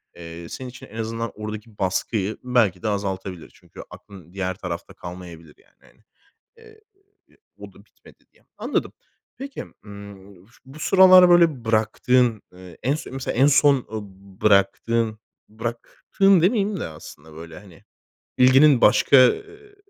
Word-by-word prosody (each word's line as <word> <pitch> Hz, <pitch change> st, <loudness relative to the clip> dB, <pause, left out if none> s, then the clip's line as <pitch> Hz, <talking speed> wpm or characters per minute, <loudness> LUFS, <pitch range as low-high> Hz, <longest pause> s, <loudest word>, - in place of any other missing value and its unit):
eee, 85 Hz, 0 st, -10 dB
senin 130 Hz, -1 st, -8 dB
için 125 Hz, -, -13 dB
en 110 Hz, -, -16 dB
azından 115 Hz, +1 st, -4 dB
oradaki 105 Hz, 0 st, -9 dB
baskıyı 95 Hz, +2 st, -2 dB
belki 115 Hz, -8 st, 0 dB
de -, -, -2 dB
azaltabilir. 95 Hz, -3 st, -5 dB
Çünkü -, -, -14 dB
aklın 90 Hz, -4 st, -15 dB
diğer 95 Hz, -1 st, -3 dB
tarafta 85 Hz, -3 st, -7 dB
kalmayabilir, 85 Hz, -3 st, -11 dB
yani, -, -, -30 dB
hani, 110 Hz, -, -25 dB, 0.5 s
eee, 445 Hz, -1 st, -19 dB, 0.8 s
o -, -, -12 dB
da -, -, -20 dB
bitmedi -, -, -23 dB
diye. -, -, -31 dB
Anladım. -, -, -3 dB, 0.5 s
Peki, 275 Hz, +1 st, -7 dB, 0.2 s
ımm, 100 Hz, -2 st, -13 dB
ş 120 Hz, -, -26 dB
bu 135 Hz, +3 st, -14 dB
sıralar 185 Hz, +1 st, +6 dB
böyle 165 Hz, -8 st, +3 dB
bıraktığın, 115 Hz, +1 st, +1 dB
eee, 90 Hz, -2 st, -14 dB
en 135 Hz, +4 st, 0 dB
son 150 Hz, -4 st, -8 dB
mesela 135 Hz, -1 st, -5 dB
en 135 Hz, +3 st, +4 dB
son, 145 Hz, 0 st, +4 dB, 0.2 s
ııı, 110 Hz, -1 st, -4 dB
b 95 Hz, 0 st, -19 dB
bıraktığın 110 Hz, +2 st, +1 dB, 0.3 s
bıraktığın 120 Hz, -, 0 dB
demeyeyim 200 Hz, +2 st, 0 dB
de -, -, -4 dB
aslında 80 Hz, 0 st, -14 dB
böyle, 80 Hz, 0 st, -11 dB
hani, 95 Hz, -6 st, -18 dB, 0.6 s
bilginin 130 Hz, +1 st, +5 dB
başka, 140 Hz, -, +4 dB
eee, 415 Hz, -, -5 dB
110 Hz, 145 wpm, -22 LUFS, 95-135 Hz, 0.8 s, sıralar